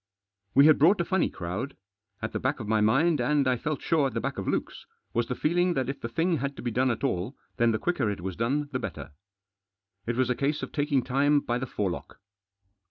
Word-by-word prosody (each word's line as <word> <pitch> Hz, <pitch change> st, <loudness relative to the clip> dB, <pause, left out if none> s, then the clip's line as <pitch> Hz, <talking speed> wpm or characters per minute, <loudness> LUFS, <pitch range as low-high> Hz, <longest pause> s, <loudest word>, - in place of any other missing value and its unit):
We 140 Hz, +2 st, +8 dB
had 155 Hz, -1 st, +6 dB
brought 180 Hz, +7 st, +5 dB
a 175 Hz, -, +1 dB
funny 190 Hz, +1 st, +1 dB
crowd. 95 Hz, +11 st, -5 dB, 0.5 s
At -, -, -2 dB
the -, -, -2 dB
back -, -, -1 dB
of 110 Hz, -, -6 dB
my 110 Hz, 0 st, +2 dB
mind, 135 Hz, +7 st, +3 dB
and 140 Hz, +2 st, +2 dB
I 130 Hz, -, +3 dB
felt 150 Hz, +4 st, -3 dB
sure 155 Hz, -4 st, +2 dB
at 125 Hz, -, -7 dB
the -, -, +1 dB
back -, -, -3 dB
of -, -, -5 dB
Luke's, -, -, -3 dB, 0.3 s
was 120 Hz, 0 st, 0 dB
the 125 Hz, -, -2 dB
feeling 175 Hz, +4 st, +1 dB
that 130 Hz, -1 st, -1 dB
if 140 Hz, -, -5 dB
the 115 Hz, -, -4 dB
thing 165 Hz, +8 st, +1 dB
had 140 Hz, 0 st, -3 dB
to -, -, -9 dB
be 120 Hz, -, -1 dB
done 130 Hz, +3 st, +2 dB
at 120 Hz, +1 st, -2 dB
all 120 Hz, 0 st, -1 dB, 0.2 s
then 120 Hz, -1 st, +4 dB
the 110 Hz, -, +1 dB
quicker 135 Hz, -6 st, 0 dB
it 100 Hz, -3 st, -4 dB
was 95 Hz, 0 st, -4 dB
done 140 Hz, +7 st, 0 dB
the 130 Hz, -, -1 dB
better. 95 Hz, -8 st, -6 dB, 1.0 s
It 115 Hz, -, 0 dB
was 130 Hz, 0 st, +1 dB
a -, -, +1 dB
case 145 Hz, +3 st, -1 dB
of -, -, -5 dB
taking 145 Hz, -3 st, +1 dB
time 145 Hz, +3 st, +3 dB
by 120 Hz, -3 st, -2 dB
the 130 Hz, -, -4 dB
forelock. 100 Hz, -7 st, -4 dB
130 Hz, 240 wpm, -27 LUFS, 115-150 Hz, 1.0 s, We